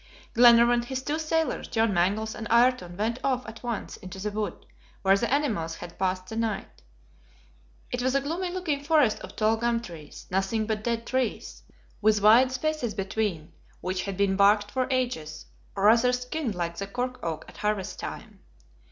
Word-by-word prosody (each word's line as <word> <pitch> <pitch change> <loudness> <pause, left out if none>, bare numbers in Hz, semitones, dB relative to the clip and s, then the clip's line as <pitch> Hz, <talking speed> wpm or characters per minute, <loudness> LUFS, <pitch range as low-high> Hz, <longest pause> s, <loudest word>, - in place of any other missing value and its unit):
Glenarvan, 235 0 +6
his 260 +2 -4
two 300 +3 -1
sailors, 320 0 -1
John 225 -2 +1
Mangles, 205 +5 +1
and 220 - -6
Ayrton 235 -7 +3
went 225 +4 -1
off 255 -2 0
at 225 +1 -9
once 235 -4 -4
into 185 0 -9
the 210 +2 -3
wood, 210 -3 -4 0.4
where 195 0 +5
the 235 +4 -1
animals 215 - 0
had 175 -1 -10
passed 185 -1 -1
the 220 - -8
night. 225 -3 -3 1.1
It 245 - -2
was 260 +1 +1
a 275 - +3
gloomy 335 +6 -2
looking 345 -6 -2
forest 295 -7 +3
of - - -10
tall 220 +1 +2
gum 235 0 +1
trees; 165 -9 -10
nothing 195 +4 0
but 215 -1 -2
dead 230 0 -1
trees, 255 -3 -2 0.4
with 215 0 +4
wide 240 +5 +7
spaces 255 -4 -2
between, 195 -5 -2 0.3
which 185 0 -2
had 195 -2 -4
been 200 -1 +2
barked 205 +1 +4
for 255 -1 0
ages, 240 - -2 0.3
or 195 - -2
rather 230 +4 +5
skinned 250 -1 -3
like 170 -1 -3
the 200 - -4
cork 250 +4 -3
oak 165 -2 -4
at - - -14
harvest 210 -2 -2
time. - - -7
225 Hz, 180 wpm, -27 LUFS, 195-250 Hz, 1.1 s, wide